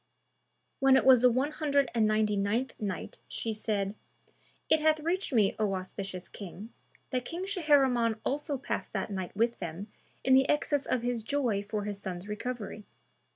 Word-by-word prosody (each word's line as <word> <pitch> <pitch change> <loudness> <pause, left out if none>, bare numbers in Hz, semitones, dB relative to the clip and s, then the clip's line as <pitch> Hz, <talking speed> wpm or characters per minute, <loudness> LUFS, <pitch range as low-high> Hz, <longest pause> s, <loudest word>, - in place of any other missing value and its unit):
When 270 -1 +6
it - - +2
was 260 -3 +8
the 250 - +7
One 260 +5 +1
Hundred 285 -4 +1
and 225 -2 +3
Ninety 215 -1 +2
ninth 215 +6 0
Night, 200 -4 -4
She 225 - -3
said, 205 -2 -1 0.7
It 315 - +4
hath 310 0 +3
reached 350 +4 -1
me, 215 -6 +3
O 205 -3 +1
auspicious 185 0 -5
King, 200 +3 -9 0.4
that 250 -2 0
King 345 +8 -5
Shahriman 275 - +3
also 285 0 -1
passed 265 - -4
that - - -2
night 190 -2 -4
with 235 +2 +1
them 175 +4 -6 0.3
in 260 - +4
the 265 +1 +5
excess 290 -1 +1
of 250 -2 0
his 245 -1 -1
joy 235 -4 0
for 205 +1 -3
his 205 -1 -5
son's 185 0 -5
recovery. 210 0 -5
230 Hz, 170 wpm, -30 LUFS, 205-270 Hz, 0.7 s, was